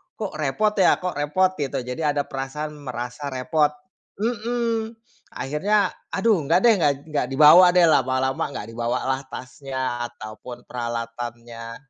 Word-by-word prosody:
kok 210 -3 -5
repot 155 +9 +1
ya 180 - +4
kok 180 -4 -3
repot 165 +6 +2
gitu 135 -2 -2
jadi 145 +5 -1
ada 145 - +1
perasaan 150 +3 -5
merasa 125 +1 -6
repot 150 +4 +1 0.5
mhm, 230 0 -1 0.4
akhirnya 200 +9 +1 0.2
aduh 215 0 +3
enggak 165 +6 +3
deh 235 -2 +7
gak 145 -3 +3 0.2
gak 140 -4 0
dibawa 155 +6 +8
deh 180 - +6
lama-lama 130 -1 +1
enggak 105 - -6
dibawalah 125 +3 -1
tasnya 130 -2 -4
ataupun 120 +3 -9
peralatannya, 115 -1 -6
140 Hz, 130 wpm, -23 LUFS, 125-180 Hz, 0.5 s, dibawa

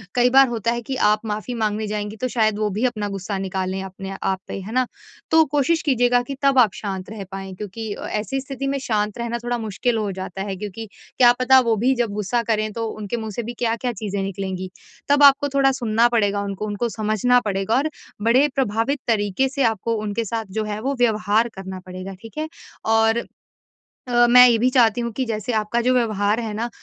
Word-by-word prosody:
कई 245 0 +4
बार 270 +1 +6
होता 230 -1 -1
है 240 0 -2
कि 265 +3 -4
आप 210 0 +2
माफ़ी 215 +3 -3
माँगने 215 -1 -1
जाएँगी 210 0 -4
तो 255 - +1
शायद 220 -3 +1
वो 215 -1 +1
भी 245 - +1
अपना 215 -4 -1
गुस्सा 195 0 -4
निकालें 190 0 -3
अपने 195 0 -7
आप 190 -1 0
पे। - - -5
है 200 - -8
ना? 255 0 +2 0.5
तो 320 0 +7
कोशिश 295 +3 +1
कीजिएगा 245 -3 +3
कि 275 +2 -6
तब 275 -1 +4
आप 225 -6 +5
शांत 190 -3 -5
रह 210 -3 -6
पाएँ 195 0 -6
क्योंकि 210 +3 -6
अ, - - -7
ऐसी 245 +6 -2
स्थिति 275 0 -5
में 275 0 0
शांत 210 -4 -1
रहना 235 0 -2
थोड़ा 240 0 -1
मुश्किल 225 +2 -1
हो 210 -2 -1
जाता 190 0 -6
है 195 - -3
क्योंकि 210 +2 -6 0.3
क्या 245 -2 +7
पता 260 +1 +6
वो 225 - +4
भी 265 - +5
जब 240 -4 0
गुस्सा 210 +3 -1
करें 215 0 0
तो 230 -1 -3
उनके 215 +1 -5
मुँह 220 -1 -5
से 235 +4 -4
भी 235 +2 -5
क्या-क्या 235 +1 0
चीज़ें 200 -1 -4
निकलेंगी। 190 -1 -4 0.4
तब 285 0 +5
आपको 285 0 +6
थोड़ा 270 -1 +4
सुनना 235 -3 +2
पड़ेगा 205 -4 +1
उनको, 200 +1 -4
उनको 210 +3 -2
समझना 215 +3 +2
पड़ेगा 195 +1 -1
और 290 +4 +1 0.3
बड़े 245 +6 +4
प्रभावित 255 +2 0
तरीके 215 +3 +1
से 275 +1 -1
आपको 225 0 0
उनके 215 +2 -2
साथ 225 +1 -3
जो - - 0
है 210 0 -4
वो 275 +4 -1
व्यवहार 220 0 +2
करना 190 -1 -7
पड़ेगा। 185 +1 -7
ठीक 225 +6 -12
है? 310 +1 -3 0.4
और 225 +1 +2 0.8
अ, 240 0 +5
मैं 250 +1 +9
ये 235 -2 +4
भी 245 +3 +2
चाहती 240 -2 +4
हूँ 235 -1 -3
कि 260 +4 -1
जैसे 220 0 -3
आपका 215 +2 0
जो 250 +2 +2
व्यवहार 215 -3 +1
है 225 -3 -4
ना 230 +3 -3
225 Hz, 215 wpm, -22 LUFS, 205-245 Hz, 0.8 s, मैं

